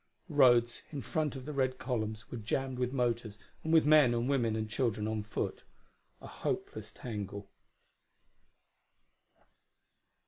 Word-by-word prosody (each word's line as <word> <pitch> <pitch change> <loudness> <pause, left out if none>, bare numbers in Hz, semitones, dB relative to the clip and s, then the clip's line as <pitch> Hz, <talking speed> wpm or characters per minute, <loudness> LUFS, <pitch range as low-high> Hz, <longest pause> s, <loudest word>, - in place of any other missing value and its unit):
The 165 - -9
roads, 120 -4 +5
in 145 -3 -5
front 145 +5 -1
of 130 -1 -7
the 150 - -5
red 130 -2 0
columns, 110 -4 -3
were 120 - -4
jammed 130 +4 -2
with 125 0 0
motors 120 -5 -1 0.3
and 160 - -1
with 160 -2 +6
men 150 -5 +6
and 120 +1 0
women 120 -6 +1
and 110 0 -2
children 110 -2 -1
on 110 -1 -1
foot: 105 - -3 0.6
a - - -12
hopeless - - -4
tangle. 100 -3 -6
120 Hz, 140 wpm, -32 LUFS, 110-135 Hz, 0.6 s, with